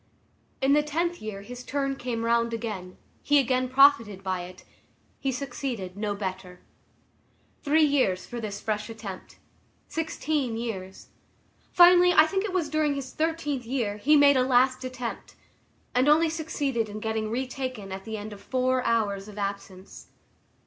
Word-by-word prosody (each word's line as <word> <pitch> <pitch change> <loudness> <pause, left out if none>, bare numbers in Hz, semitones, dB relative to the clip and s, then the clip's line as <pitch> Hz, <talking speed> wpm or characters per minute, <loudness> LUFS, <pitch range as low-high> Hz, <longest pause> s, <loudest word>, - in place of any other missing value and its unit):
In 270 +1 +4
the 295 - +5
tenth 335 +4 -2
year 205 -2 -6
his 245 +3 -9
turn 275 0 -2
came 240 -3 -3
round 235 0 +1
again; 200 -6 -6 0.2
he 290 - +3
again 255 -1 +1
profited 250 -8 +4
by 185 -1 -2
it; 180 +1 -13 0.6
he 270 - -1
succeeded 245 -7 -5
no 205 0 -2
better. 185 -2 -6 1.0
Three 310 +2 +3
years 260 -11 +1
for 240 -1 -6
this 205 -2 -5
fresh 215 0 -3
attempt. 215 -4 -9 0.5
Sixteen 305 -6 -2
years. 190 -5 -6 0.6
Finally, 355 0 +7
I 310 - +7
think 385 +4 -1
it 425 - -3
was 360 -4 0
during 300 -1 +1
his 270 -2 -6
thirteenth 310 -5 -1
year, 230 -5 -1
he 295 +9 +4
made 285 -1 +6
a - - +4
last 255 +1 +3
attempt, 255 -2 -6 0.6
and 255 +3 +3
only 320 +2 +5
succeeded 285 -8 -2
in 210 +1 -6
getting 220 0 -2
retaken 255 -4 -4
at 190 0 -6
the 220 0 -5
end 210 +1 -7
of 200 - -12
four 255 +1 0
hours 205 -4 0
of 210 -1 -11
absence. 200 -2 -6
245 Hz, 155 wpm, -26 LUFS, 210-285 Hz, 1.0 s, Finally